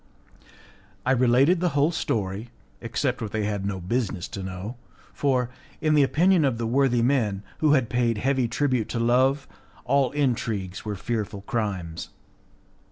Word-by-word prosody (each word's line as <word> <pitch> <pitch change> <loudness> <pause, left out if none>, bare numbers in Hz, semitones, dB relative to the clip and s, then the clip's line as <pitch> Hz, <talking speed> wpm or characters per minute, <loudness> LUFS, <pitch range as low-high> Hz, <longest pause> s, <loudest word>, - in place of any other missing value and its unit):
I 130 - +2
related 130 +7 +4
the 180 0 +1
whole 145 +4 +4
story, 105 - -2 0.3
except 125 +2 -2
what 110 -3 -4
they 110 -1 -1
had 100 -2 -2
no 95 -1 -3
business 100 -1 -2
to 100 - -6
know, 95 +5 -6 0.4
for, 125 -4 0 0.3
in 155 -1 +2
the 150 - +5
opinion 170 +5 +4
of 130 -5 +1
the 115 - -2
worthy 120 0 +2
men, 110 -7 +1 0.2
who 155 -2 +4
had 130 -5 +3
paid 120 -2 +1
heavy 130 +2 +1
tribute 125 -1 0
to 120 - -2
Love, 130 +4 +2 0.4
all 135 0 +3
intrigues 110 -9 -1
were 105 -1 -3
fearful 105 -1 -3
crimes. 95 -7 -3
120 Hz, 155 wpm, -25 LUFS, 105-135 Hz, 0.4 s, the